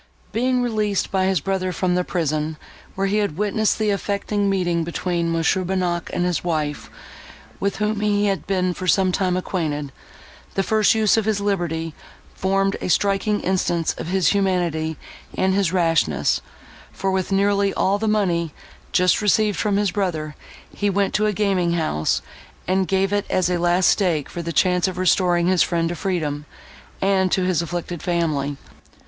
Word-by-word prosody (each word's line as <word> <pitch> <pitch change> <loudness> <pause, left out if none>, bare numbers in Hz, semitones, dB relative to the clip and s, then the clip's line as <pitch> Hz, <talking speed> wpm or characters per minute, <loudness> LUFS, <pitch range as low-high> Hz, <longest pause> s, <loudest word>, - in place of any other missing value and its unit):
Being 250 +2 +1
released 215 -4 -1
by 190 -1 +1
his 190 -5 +1
brother 190 0 -1
from 180 +1 0
the 180 0 +1
prison, 155 -3 -2 0.4
where 195 - 0
he 200 +2 +1
had 205 -7 -1
witnessed 210 +1 +1
the 215 -1 +1
affecting 200 0 -1
meeting 175 -3 0
between 170 0 -2
Mons. 165 -1 +2
Bonnac 180 -2 -1
and 175 - 0
his 180 -3 -1
wife, 155 -4 -2 0.7
with 200 0 -1
whom 210 0 -1
he 205 -1 +1
had 195 -2 -1
been 185 -2 +1
for 185 +1 -6
some 185 +1 +3
time 180 -1 0
acquainted, 150 -6 -3 0.6
the 195 - +1
first 215 +2 +3
use 220 0 +3
of 220 - +1
his 215 -2 +1
liberty 170 -5 -2 0.4
formed 195 +1 0
a - - -2
striking 200 +3 +1
instance 175 -3 0
of - - -5
his 185 0 +2
humanity 175 -6 0 0.4
and 190 0 +2
his 195 -3 +1
rashness; 165 - +1 0.5
for 195 0 -2
with 190 0 -1
nearly 200 0 +2
all 195 +2 +1
the 220 - -1
money, 175 -7 0 0.4
just 180 +2 +3
received 210 -1 +2
from 205 -2 +1
his 205 -2 +1
brother, 165 -6 -2 0.4
he 205 - 0
went 200 0 0
to 215 +1 +2
a - - +2
gaming 190 -4 +1
house, 155 - 0 0.4
and 190 0 +1
gave 195 +1 +1
it 205 0 0
as 180 -1 +1
a 175 - 0
last 175 +1 +2
stake 170 -8 +1
for 175 - -5
the 170 0 -4
chance 180 +3 +2
of 185 -1 -4
restoring 180 -1 +2
his 185 -1 +3
friend 165 -1 +1
to 175 - -3
freedom, 150 -5 -2 0.6
and 190 -1 +2
to 185 - +2
his 180 -3 +1
afflicted 175 0 -4
family. 155 -5 -1
185 Hz, 175 wpm, -22 LUFS, 170-200 Hz, 0.7 s, some